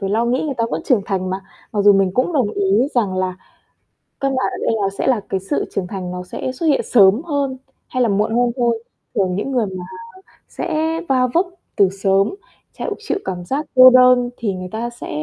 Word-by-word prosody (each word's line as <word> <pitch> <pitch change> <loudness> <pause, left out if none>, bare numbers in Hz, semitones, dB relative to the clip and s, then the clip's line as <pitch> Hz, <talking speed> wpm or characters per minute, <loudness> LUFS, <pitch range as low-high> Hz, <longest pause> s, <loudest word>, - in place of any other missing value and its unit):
phải 195 -1 -2
lo 225 +3 +1
nghĩ, 245 +2 0
người 290 -3 -2
ta 230 -2 0
vẫn - - -3
trưởng 240 -8 +2
thành 185 -2 -2
mà. 190 +1 -3 0.3
Mặc 210 - 0
dù 205 0 +7
mình 195 -1 +2
cũng 255 +7 +1
đồng 255 -9 +1
ý 205 +7 +1
rằng 205 -6 +1
là 185 -1 -1 0.8
căn 275 -1 0
bản 260 - 0
ở - - -5
đây - - +1
là 195 - +1
sẽ - - -1
là 255 -4 +3
cái 190 - -1
sự 195 - -2
trưởng 185 - -1
thành 185 -2 -5
nó 180 0 -5
sẽ 180 +7 -5
xuất 315 +6 -3
hiện 285 - +3
sớm 205 +2 +5
hơn 285 -5 -2 0.3
hay 255 -1 0
là 230 - +2
muộn 210 +3 +1
hơn 245 0 +2
thôi. 235 -3 0 0.3
Thường 185 -2 +1
những 210 +7 -3
người 245 -4 +1
mà 185 -2 -6 0.7
sẽ 320 +1 -2
va 255 -1 +3
vấp 355 +3 +3 0.3
từ 195 -2 +5
sớm, 195 - +1 0.4
thẹo - - -3
chịu 425 -1 -3
cảm 180 -2 -4
giác 280 - -2
cô 255 0 +10
đơn 250 -1 +5
thì 210 -5 -2
người 185 0 -6
ta 230 +2 -3
sẽ 240 - -9
230 Hz, 230 wpm, -19 LUFS, 195-260 Hz, 0.8 s, cô